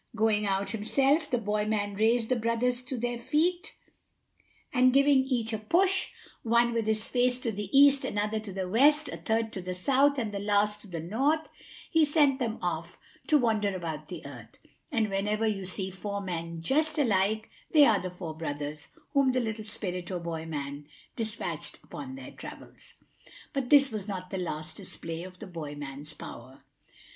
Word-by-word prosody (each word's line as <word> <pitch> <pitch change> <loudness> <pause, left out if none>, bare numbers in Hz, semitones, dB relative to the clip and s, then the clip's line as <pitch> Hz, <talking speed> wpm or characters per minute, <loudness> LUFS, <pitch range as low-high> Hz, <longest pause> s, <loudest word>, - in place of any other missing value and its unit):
Going 215 -1 +2
out 195 0 0
himself, 275 +8 +2
the 245 - +1
boy 210 -2 0
man 205 -2 0
raised 225 +3 +2
the 255 - +3
brothers 235 +2 0
to 260 -1 -3
their 240 0 -2
feet, 350 - 0 1.0
and 255 0 +5
giving 275 +1 +5
each 235 -4 -1
a 220 - -1
push, 370 - +3 0.3
one 235 +1 +3
with 230 -2 -1
his 220 0 +1
face 250 0 +2
to 230 - -1
the 205 -1 -5
East, 280 0 +7
another 210 +1 -1
to 215 -2 -7
the 190 -1 -3
West, 290 +9 +4
a - - -5
third 225 0 -1
to 190 - -3
the 180 0 -4
South, 275 +8 +3
and 225 -5 -2
the 200 - -4
last 210 +1 +1
to 205 - -13
the 170 -3 -5
North, 275 - 0 0.4
he 325 -1 +5
sent 290 -3 +3
them 230 -3 -1
off 170 -1 -3 0.3
to 305 - +5
wander 215 -6 +1
about 160 -4 -5
the 175 -3 -8
earth; 125 -5 -11 0.3
and 220 -2 +1
whenever 210 +3 0
you 200 -3 -1
see 190 +1 -1
four 200 +2 -4
men 170 -3 -5
just 310 - +2
alike, 215 -5 +2 0.2
they 300 -2 +7
are 220 -6 +4
the 185 - -4
four 175 -3 -7
brothers 150 -1 -5 0.3
whom 275 -2 +4
the 255 - +2
little 220 -2 -3
spirit 180 -4 -3
or 185 - -2
boy 165 -1 -5
man 145 -1 -5 0.3
despatched 220 -1 -3
upon 265 -1 -8
their 270 - -9
travels. - - -11 0.6
But 270 -4 -2
this 280 -2 +6
was 215 -2 -4
not 185 -3 -5
the 190 - -2
last 155 -2 -4
display 165 0 -4
of 185 +1 -10
the 215 - -9
boy 160 -6 -7
man's 145 +1 -7
power. 130 +3 -10
215 Hz, 185 wpm, -29 LUFS, 180-255 Hz, 1.0 s, East